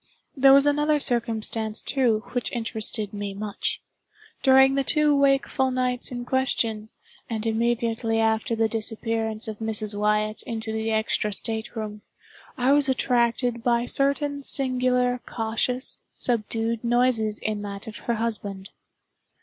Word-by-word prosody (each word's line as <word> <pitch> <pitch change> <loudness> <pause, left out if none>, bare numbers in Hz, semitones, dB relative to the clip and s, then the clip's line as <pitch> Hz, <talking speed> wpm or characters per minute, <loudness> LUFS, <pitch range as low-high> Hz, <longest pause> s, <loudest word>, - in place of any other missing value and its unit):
There 270 -1 +6
was 275 +1 +7
another 295 +1 +2
circumstance, 225 -3 0
too, 235 -6 +1
which 245 -1 -2
interested 220 -2 -1
me 205 -1 -5
much. 205 0 -3 0.6
During 265 0 +6
the 275 0 +1
two 300 +1 +3
wakeful 275 -1 +2
nights 255 -1 -1
in 245 -1 -5
question, 230 -5 0 0.4
and 225 -1 -3
immediately 225 0 0
after 225 +1 +1
the 225 0 +2
disappearance 225 0 -3
of 215 -2 -6
Mrs. 215 -1 -2
Wyatt 210 +1 0
into 220 -1 -5
the 220 0 -2
extra 220 -1 0
state 220 +3 -2
room, 210 -1 -5 0.6
I 255 +1 +2
was 285 -1 +4
attracted 240 -2 +1
by 240 -1 +2
certain 280 +2 +1
singular 250 -2 +2
cautious, 230 +3 -2
subdued 225 -1 -1
noises 235 -3 +2
in 215 -1 -3
that 200 -1 -7
of 220 - -8
her 235 - -2
husband. 205 -4 -4
230 Hz, 135 wpm, -25 LUFS, 220-255 Hz, 0.6 s, was